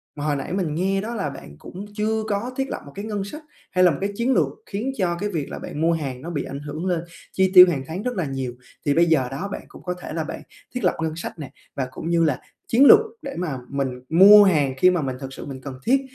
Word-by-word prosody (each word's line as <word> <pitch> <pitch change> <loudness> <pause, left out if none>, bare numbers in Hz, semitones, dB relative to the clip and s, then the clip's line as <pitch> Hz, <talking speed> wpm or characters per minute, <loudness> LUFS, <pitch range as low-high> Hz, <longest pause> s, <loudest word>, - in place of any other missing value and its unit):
hồi 145 0 -1
nãy 140 +5 -4
mình 175 -6 -1
nghe 195 +3 0
đó 230 +3 -5
là 190 -9 -2
bạn 105 - -11
cũng 190 +3 -9
chưa 220 +1 0
có 215 +4 -2
thiết 270 0 -1
lập - - -4
một 140 - -11
cái 200 - -5
ngân 210 -2 -3
sách 295 +11 -8 0.3
hay 185 0 +3
là 180 - +6
một 140 - -3
cái 200 - 0
chiến 240 +5 +1
lược - - +3 0.2
khiến 220 +7 -3
cho 180 -4 +1
cái 205 - -2
việc 160 -8 -3
là - - -5
bạn 150 - -6
mua 165 +1 +3
hàng 135 -6 -4
nó 165 - -6
bị 155 -5 -2
ảnh 140 - -6
hưởng 150 +4 -6
lên 175 -3 0 0.3
chi 190 -1 +2
tiêu 180 -1 +11
hàng 140 -6 -2
tháng 170 +5 -4
rất 250 0 -1
là 180 -5 -1
nhiều. 135 -3 -4 0.3
Thì 145 - +3
bây 170 +3 +4
giờ 155 -6 +2
đó, 145 +9 -4
bạn - - -5
cũng - - -14
có 180 - -2
thể - - -6
là 160 0 -1
bạn 155 - -6 0.3
thiết 250 - -3
lập 180 - +2
ngân 160 -1 -2
sách 170 0 -7
nè 145 -4 -7 0.2
và 130 -2 -2
cũng 160 - -6
như 170 -1 +3
là 150 -5 +1 0.3
chiến 255 +5 +5
lược 430 - +10 0.2
để 275 -2 -6
mà 160 -7 -2
mình 135 -3 -3
mua 200 +5 +9
hàng 150 -9 +3
khi 185 - +6
mà 175 -2 0
mình 130 -3 -3
thực 135 -1 -7
sự - - -8
mình 135 -2 -8
cần 130 -1 -8
thiết, 265 +3 +4
170 Hz, 280 wpm, -23 LUFS, 145-200 Hz, 0.3 s, tiêu